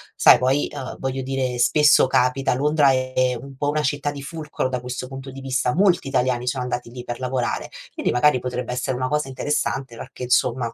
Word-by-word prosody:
Sai, - - +7
poi, 130 +3 +1
uhm, 130 - -6
voglio 135 0 -3
dire, 130 -1 -2
spesso 145 +3 +5
capita, 130 +1 +2
Londra 145 +1 +3
è 130 -1 0
un 135 +1 -11
po' 145 +1 -1
una 150 +1 0
città 145 0 -1
di 140 -1 -8
fulcro 150 -3 -4
da 125 -1 -2
questo 125 +1 -5
punto 135 +1 -8
di 135 +1 -9
vista: 130 -2 0
molti 180 -4 +3
italiani 125 -2 0
sono 125 0 -1
andati 125 -1 -4
lì 125 0 -8
per 120 -1 -5
lavorare, 125 -1 -2 0.2
quindi - - -1
magari 130 +1 +3
potrebbe 125 0 -4
essere 125 +1 -2
una 130 0 -1
cosa 150 -1 -1
interessante 135 -1 -2
perché, 125 - -9
insomma, 125 -1 +1
130 Hz, 200 wpm, -22 LUFS, 125-140 Hz, 0.2 s, Sai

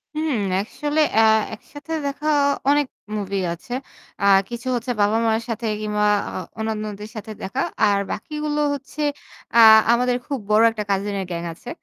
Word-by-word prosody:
হুম, 310 0 -1 0.3
আসলে 295 +9 -2 0.2
আ - - +7 0.3
একসাথে 290 +7 -11
দেখা 285 +2 -3 0.4
অনেক 290 -1 +3 0.3
মুভি 200 -1 -3 0.2
আছে। 175 +8 -9 0.5
আ 200 - +1 0.2
কিছু 240 +2 -6
হচ্ছে 245 +1 -2
বাবা-মায়ের 225 +2 +2
সাথে 230 0 -3 0.2
কিংবা 210 0 0 0.2
আ - - -9 0.3
অন্যান্যদের 215 -1 -4
সাথে 215 0 -7
দেখা। 255 +8 -3 0.2
আর 205 -1 +4
বাকিগুলো 300 -1 -3
হচ্ছে 285 +2 -7 0.5
আ - - +7 0.3
আমাদের 245 +1 +2
খুব 280 -3 -2
বড় 215 +1 +5
একটা 215 -2 -4
কাজিন 200 +1 -1
এর - - -4
গ্যাং 170 0 -3
আছে। - - -11
225 Hz, 150 wpm, -22 LUFS, 210-280 Hz, 0.5 s, আ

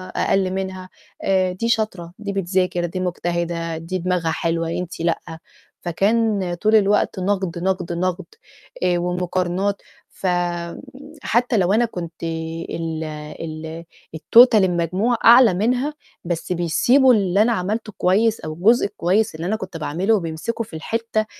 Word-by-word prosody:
أقل 190 -1 +1
منها 190 -1 -4 0.3
آآ، 185 -1 +2
"دي 230 +6 -3
شاطرة، 190 -7 -1
دي 200 -1 -4
بتذاكر، 180 -2 0
دي 175 +2 -4
مجتهدة، 170 -2 -2
دي 165 +3 -4
دماغها 180 -2 -1
حلوة، 165 -1 -1
أنتِ 180 +1 -4
لأ." 170 0 +1 0.6
فكان 200 +1 +1
طول 215 +6 +2
الوقت 205 -1 +2
نقد، 185 -2 -1
نقد، 185 -2 -1
نقد، 185 +1 -2 0.6
آآ 175 -1 +2
ومقارنات. 180 +2 -1 0.3
ف 190 - -5 1.0
حتى 240 +1 +1
لو 190 0 +2
أنا 235 +3 +3
كنت 170 -7 -7
ال 165 0 -4 0.4
ال 160 +1 -7 0.3
الTotal 235 +9 +6
المجموع 185 +6 +1
أعلى 235 -2 +8
منها، 250 +10 0 0.3
بس 170 +1 -3
بيسيبوا 240 - +4
اللي 200 -2 +2
أنا 230 +2 +3
عملته 215 +2 -3
كويس 215 +5 +2
أو 155 - -5
الجزء 210 +9 +3
الكويس 200 0 0
اللي 165 +3 -4
أنا 215 - 0
كنت 215 - -6
باعمله 175 +8 0
وبيمسكوا 170 +6 -3
في 160 - -11
الحتّة 220 +5 -2
185 Hz, 135 wpm, -21 LUFS, 170-215 Hz, 1.0 s, أعلى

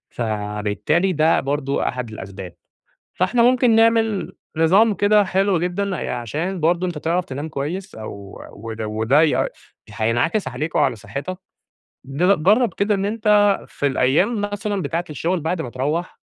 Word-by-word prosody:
فبالتالي 110 - -1
ده 155 +1 +3
برضه 140 0 -1
أحد 125 -3 -4
الأسباب. 95 -4 -8 0.6
فإحنا 235 +7 +2
ممكن 245 -1 +4
نعمل 225 -2 +2 0.2
نظام 195 +7 +4
كده 205 +1 +4
حلو 190 -1 +1
جدًا، 185 +3 -2 0.2
عشان 155 - -3
برضه 170 +3 +1
أنت 175 - -4
تعرَف 170 +4 -1
تنام 145 +4 -5
كويس 170 +8 -5
أو 100 -2 -9
وده 110 0 -6
وده 125 +9 +2 0.4
هينعكس 120 - 0
عليك 150 +6 -4
وعلى - - +2
صحتك، 140 - -6 0.7
ض 160 +6 +1
جرَّب 220 +7 +3
كده 205 +1 +1
إن 195 0 -1
أنت 210 -1 +3
في 145 - -3
الأيام 145 - +2
مثلًا 205 -1 -2
بتاعة 170 +1 -2
الشغل 170 +5 -1
بعد 160 +2 -2
ما 125 - -6
تروَّح 150 +8 -3
165 Hz, 140 wpm, -21 LUFS, 130-200 Hz, 0.7 s, ممكن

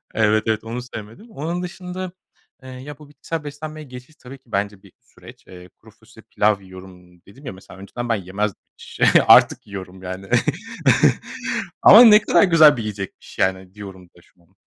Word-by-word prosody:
Evet, 110 0 +2
evet, 110 -1 -1
onu 115 +2 -6
sevmedim. 120 - -11
Onun 170 0 -4
dışında, 180 0 -7 0.5
eee, 130 - -11
ya, 130 +3 -10
bu 150 -2 -15
bitkisel 155 +2 -7
beslenmeye 155 +1 -8
geçiş 125 +3 -13
tabii 130 0 -13
ki - - -48
bence 100 0 -3
bir 100 - -18
süreç. 125 +1 -18
Eee, 90 0 -14
kuru - - -21
fasulye - - -20
pilav 105 -1 +1
yiyorum. 90 -2 -15
Dedim 130 +9 -17
ya, 125 - -6
mesela, 95 0 -15
önceden 120 +5 -7
ben 115 - +2
yemez 100 +1 -3 0.7
Artık - - +5
yiyorum, 95 -2 -10
yani. 95 +1 -8 1.5
Ama - - +9
ne 210 -1 +7
kadar - - +3
güzel 160 -6 +6
bir - - -4
yiyecekmiş, 105 -3 -8
yani, 95 0 -1
diyorum 95 -3 -11
da 85 - -23
şu 90 - -30
an. 90 +3 -33
110 Hz, 170 wpm, -20 LUFS, 95-145 Hz, 1.5 s, Ama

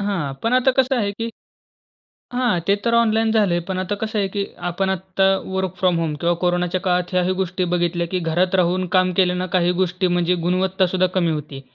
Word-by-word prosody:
हां, 180 -9 -2
पण 230 - 0
आता 255 +1 +4
कसं 260 +1 0
आहे, 205 -4 0
की 230 +2 -4 1.0
हां. 245 -8 +1
ते 200 - +4
तर 235 - +2
ऑनलाईन 225 -1 +3
झालंय 205 -6 +2
पण 185 -1 -2
आता 185 +2 -2
कसं 215 +1 -3
आहे, 195 -1 +1
की 200 0 -2 0.2
आपण 190 +2 -1
आत्ता 190 +1 -1 0.2
वर्क 190 -1 -2
फ्रॉम 180 -2 +2
होम 160 -2 -1
किंवा 170 0 +2
कोरोनाच्या 180 +1 0
काळात 180 -1 0
ह्याही 180 0 +1
गोष्टी 185 0 -1
बघितल्या, 175 0 0
की 185 - 0
घरात 175 +3 0
राहून 185 0 +2
काम 185 0 +3
केले 180 -2 +3
ना 180 0 -2
काही 175 0 +2
गोष्टी 180 +1 0
म्हणजे 175 0 +1
गुणवत्ता 185 +1 +1
सुद्धा 185 +1 +1
कमी 175 -3 +2
होती, 150 -3 -6
185 Hz, 205 wpm, -21 LUFS, 175-200 Hz, 1.0 s, आता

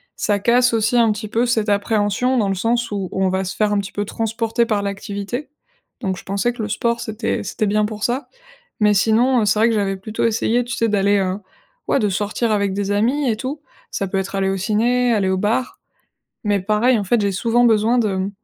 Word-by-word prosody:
ça 205 -1 0
casse 240 +4 +3
aussi 225 +2 +1
un 230 -2 +4
petit 215 +1 -4
peu 235 +3 0
cette 225 -3 +1
appréhension, 205 +4 +1
dans 210 -4 +1
le 195 - 0
sens 230 +4 0
où, 195 -3 -3
on 190 0 +1
va 190 +1 -1
se 185 - -5
faire 210 -1 +1
un 205 - +2
petit 200 0 -5
peu 205 - -3
transporter 225 +2 -1
par 210 -2 0
l'activité. 200 +6 -5 0.5
Donc, 190 -5 -1
je - - -9
pensais 200 +5 -1
que 240 - -6
le 215 - -3
sport, 235 +3 0
c'était 220 0 -3
c'était 215 - -2
bien 210 +1 +1
pour 210 0 -6
ça. 250 +2 -1 0.5
Mais 210 -1 +4
sinon, 230 +5 +3
heu, - - +1
c'est 205 +1 +2
vrai 225 - +5
que - - +1
j'avais 195 -2 0
plutôt 215 +3 -3
essayé, 230 +2 +1
tu 240 -1 -5
sais, 230 - +1
d'aller, 205 0 +2
heu, 190 0 -1 0.5
ouais, - - +2
de 210 - +1
sortir 210 +4 -1
avec 200 -2 +1
des 200 0 -2
amis 250 +8 +1
et 220 - +1
tout. 265 +6 -5 0.3
Ça 195 - -2
peut 190 +1 -1
être 195 +1 -4
aller 195 0 +1
au 195 - -1
ciné, 235 +5 +1
aller 200 -3 +1
au 190 - +1
bar. 225 +6 -1 0.7
Mais 205 -2 +1
pareil, 215 +5 +2
en 205 - -1
fait, 230 +5 +1
j'ai 200 -1 0
souvent 235 +5 +2
besoin 225 +1 +3
de, 195 -4 0
215 Hz, 230 wpm, -20 LUFS, 200-235 Hz, 0.7 s, vrai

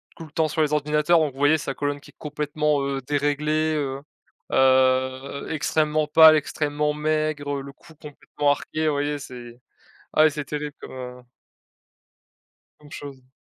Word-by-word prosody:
tout 165 - -10
le 155 - -16
temps 160 0 +1
sur 155 +1 -1
les 150 -1 +1
ordinateurs 150 +3 +2
donc 155 -3 0
vous 135 - -13
voyez 145 +2 +4
sa 135 -2 -4
colonne 145 0 -3
qui - - -16
est - - -45
complètement, 150 -1 -1
heu, 135 -1 -2
déréglée, 150 +3 0
heu 140 -2 -3 0.5
heu, 130 +1 +2
extrêmement 155 0 0
pâle, 160 0 +8
extrêmement 150 0 -1
maigre, 150 -1 -1
heu, - - -4
le 140 - -9
cou 160 +1 -19
complètement 145 -1 -2
arqué, 155 +2 -2
voyez 145 0 0
c'est 120 -3 -10 0.5
ah 155 - +5
ouais 155 - +5
c'est 150 0 -5
terrible 150 +1 -5
comme - - -10
heu 125 -1 -8 1.6
comme 150 +1 -17
chose. 135 -4 -10
145 Hz, 165 wpm, -24 LUFS, 140-155 Hz, 1.6 s, pâle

